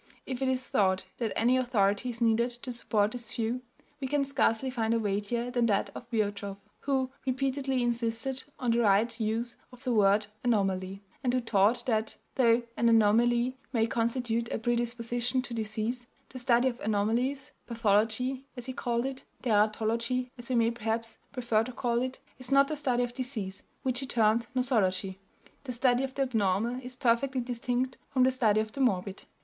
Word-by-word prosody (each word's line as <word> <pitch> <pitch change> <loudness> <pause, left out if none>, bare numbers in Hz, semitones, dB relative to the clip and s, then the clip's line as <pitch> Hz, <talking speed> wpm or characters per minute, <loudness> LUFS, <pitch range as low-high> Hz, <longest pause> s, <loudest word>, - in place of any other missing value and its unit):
If 260 0 -4
it 265 - +1
is 260 0 0
thought 190 -9 +1 0.2
that 230 -3 -1
any 245 +3 +3
authority 220 -3 +1
is 240 0 -6
needed 230 +1 +3
to 255 - -3
support 215 -3 +1
this 240 -2 -4
view, 235 +2 -1 0.4
we 270 - -2
can 285 +1 +1
scarcely 260 -2 +1
find 230 -2 0
a - - +2
weightier 215 +4 -1
than 240 -2 +2
that 200 -3 +1
of 240 - -9
Virchow, 205 -3 -2 0.2
who 265 -2 0 0.2
repeatedly 265 0 0
insisted 235 +2 -1 0.2
on 245 -2 0
the 235 - +2
right 225 +2 +3
use 225 +2 -1
of 250 +1 -15
the 250 - 0
word 205 0 +4 0.2
"anomaly," 195 -4 0 0.2
and 250 - +2
who - - +3
taught 225 -1 +2
that, 220 -3 0 0.2
though 235 -2 +4
an 235 - +3
anomaly 235 +3 +3
may 225 -2 +3
constitute 230 0 -1
a - - 0
predisposition 240 +1 -1
to 245 - -6
disease, 225 +2 -3 0.2
the 255 - -8
study 245 0 +3
of 245 -1 -2
anomalies 230 +6 0 0.2
pathology, 230 +4 +1
as 245 - -6
he 260 - -4
called 240 -1 -1
it, 270 0 -5 0.2
teratology 230 +3 +1
as 240 0 -9
we 255 - +1
may 230 0 +3
perhaps 225 0 -3
prefer 235 -4 +1
to 250 - -6
call 235 -1 0
it 260 +1 -3 0.2
is 255 - -7
not 275 0 +6
the 310 - -2
study 255 -4 +1
of 245 0 -4
disease, 235 -7 -4 0.2
which 255 -1 0
he 270 - -4
termed 230 -1 +2
nosology; 195 -7 +1 0.5
the 255 - -3
study 250 +1 +2
of 265 -1 -4
the 275 - +2
abnormal 225 0 0
is 250 0 -7
perfectly 255 +1 +1
distinct 250 +1 -2
from 260 -2 +3
the 260 - +5
study 220 -5 +3
of 215 0 -5
the 275 - -4
morbid. 195 -5 0
235 Hz, 180 wpm, -29 LUFS, 220-255 Hz, 0.5 s, not